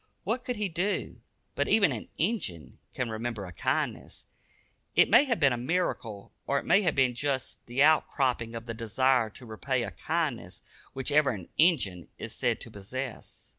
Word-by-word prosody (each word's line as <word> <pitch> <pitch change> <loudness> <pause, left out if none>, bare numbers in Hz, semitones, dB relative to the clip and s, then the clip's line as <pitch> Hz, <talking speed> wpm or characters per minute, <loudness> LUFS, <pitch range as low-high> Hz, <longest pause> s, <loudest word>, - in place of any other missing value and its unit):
What 235 +5 -1
could 250 - -3
he 210 -2 -1
do? 185 +4 -2 0.3
But - - 0
even 200 -7 +4
an 115 -5 -5
"Injun" 160 - -2 0.2
can 125 -3 -2
remember 110 -2 -3
a 90 - -9
kindness. - - -2 0.7
It - - +5
may 290 - +7
have 240 -5 0
been 140 -3 +4
a - - -2
miracle, 120 - -2 0.2
or 140 - +2
it - - -3
may 200 - +5
have 175 -6 +1
been 130 -2 +3
just 135 +1 -3
the 125 +4 +2
out 155 +1 +5
cropping 120 -4 0
of 115 0 -6
the 115 - -4
desire 115 +1 +2
to 125 +4 -13
repay 120 +3 -2
a 105 - -4
kindness 140 - -3 0.3
which 135 +2 -3
even 145 -4 +4
an 85 - -14
"Injun" 105 - +2
is - - -6
said - - 0
to - - -7
possess. 120 +5 -7
130 Hz, 185 wpm, -29 LUFS, 115-160 Hz, 0.7 s, may